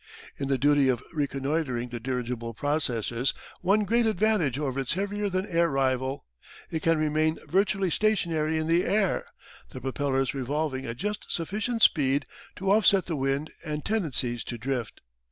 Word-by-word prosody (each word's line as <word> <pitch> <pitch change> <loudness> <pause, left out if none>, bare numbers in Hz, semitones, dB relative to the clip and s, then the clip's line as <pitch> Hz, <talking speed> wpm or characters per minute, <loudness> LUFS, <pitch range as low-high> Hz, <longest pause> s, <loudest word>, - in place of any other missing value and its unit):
In 140 - -2
the 135 -1 +2
duty 145 -1 +4
of 125 -1 0
reconnoitring 140 -3 -1
the 120 0 -5
dirigible 120 -2 -3
possesses 125 -4 0 0.3
one 200 +4 +3
great 230 +3 +2
advantage 210 - +2
over 135 -2 -2
its 135 -1 0
heavier 205 +1 -1
than 185 0 -1
air 170 -4 +2
rival. 135 -1 0 0.5
It 160 - -2
can 165 0 +3
remain 155 +1 +1
virtually 195 0 +1
stationary 165 -7 +1
in 155 - -1
the 165 +2 +3
air, 200 -2 +1 0.4
the - - -8
propellers 135 0 -1
revolving 135 0 -2
at 115 0 -5
just 210 +8 -4
sufficient 215 +7 -1
speed 140 -2 +4 0.3
to 190 +1 0
off 210 0 +5
set 195 -2 +5
the 165 - -2
wind 135 +2 -1
and 150 -2 -4
tendencies 135 - 0
to 120 - -5
drift. 125 -1 -3
150 Hz, 160 wpm, -27 LUFS, 130-185 Hz, 0.5 s, off